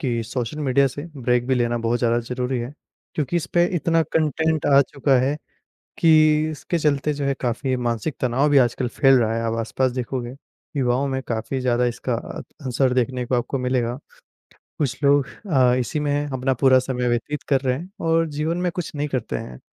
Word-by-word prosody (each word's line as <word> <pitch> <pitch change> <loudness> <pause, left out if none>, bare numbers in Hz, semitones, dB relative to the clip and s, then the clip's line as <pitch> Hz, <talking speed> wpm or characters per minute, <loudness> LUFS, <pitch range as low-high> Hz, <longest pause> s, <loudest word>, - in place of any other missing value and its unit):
कि 120 -6 -1
social 125 +3 -4
media 140 -1 +3
से 145 +3 -7 0.2
break 125 0 +1
भी 130 - +2
लेना 120 -1 0
बहुत 115 +1 0
ज़्यादा 120 -1 +2
ज़रूरी 125 +2 -3
है 120 +3 -5 0.4
क्योंकि 155 +3 -1
इस 170 - -1
पे 175 0 +5
इतना 165 +1 +2
कंटेंट 160 0 0
आ 140 -1 +6
चुका 140 -1 +1
है, 140 +4 0 0.6
कि 155 -3 +4
इसके 155 +3 -3
चलते 150 -1 +1
जो 145 -1 -3
है 140 - +1
काफ़ी 130 +2 -1
मानसिक 120 +3 -2
तनाव 130 +4 +1
भी 145 - +4
आजकल 125 0 +2
फैल 135 +2 +4
रहा 110 -1 +1
है। 115 - -1
आप 115 - -1
आस-पास 130 +3 0
देखोगे 125 -1 -4 0.4
विवाहों 130 0 +1
में 130 -1 -2
काफ़ी 115 +3 -2
ज़्यादा 125 -1 +2
इसका 120 +1 -2
अ, - - -6 0.3
असर 125 +1 +1
देखने 125 0 0
को 125 - 0
आपको 120 +3 -1
मिलेगा। 125 -1 -1 0.8
कुछ 135 -2 -2
लोग 140 -1 +4 0.2
अ, 130 -4 +4
इसी 130 +5 -2
में 145 0 0
अपना 130 -1 -1
पूरा 130 -1 +7
समय 125 -1 -1
व्यतीत 120 +5 -2
कर 135 -2 +3
रहे 130 -1 0
हैं 175 +4 -9 0.2
और 165 0 +3
जीवन 155 +3 -2
में 180 0 0
कुछ 175 -2 -5
नहीं 145 +1 -1
करते 130 -5 -2
हैं। 60 0 -9
130 Hz, 200 wpm, -22 LUFS, 125-145 Hz, 0.8 s, पूरा